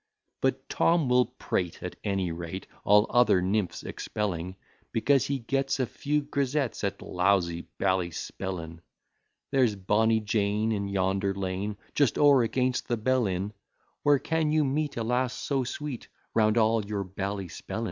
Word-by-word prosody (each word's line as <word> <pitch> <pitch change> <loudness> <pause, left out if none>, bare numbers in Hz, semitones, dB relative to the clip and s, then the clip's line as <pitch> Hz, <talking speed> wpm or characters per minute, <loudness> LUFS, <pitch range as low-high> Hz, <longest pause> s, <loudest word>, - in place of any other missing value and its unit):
But - - 0
Tom 165 -5 +2
will 125 0 +4
prate 90 -2 -3
at - - -5
any 95 -4 0
rate, 85 +3 -6 0.2
All 105 +1 +5
other 120 -6 +5
nymphs 95 +1 -1
expelling: 95 -3 -3 0.4
Because 135 +3 +2
he 140 - 0
gets 135 +3 -1
a 130 - +2
few 145 +4 -1
grisettes 140 -3 -1
At 100 - -2
lousy 90 -2 +1
Ballyspellin. 90 -1 -2 0.7
There's 130 -6 +3
bonny 110 +3 +2
Jane, 105 0 0
in 100 -2 -1
yonder 95 0 0
lane, 100 +2 -3 0.2
Just 140 -6 +2
o'er 140 -3 +6
against 125 +2 0
the 120 - 0
Bell 125 +1 +2
inn; 95 +3 -2 0.5
Where 145 -1 +5
can 160 +2 0
you 155 -1 +3
meet 145 +1 -1
a 115 - -1
lass 125 +2 0
so 135 -2 -1
sweet, 135 0 -5 0.3
Round 110 0 +3
all 110 -1 +3
your 100 -1 -3
Ballyspellin? 95 -1 -5
110 Hz, 145 wpm, -28 LUFS, 95-130 Hz, 0.7 s, o'er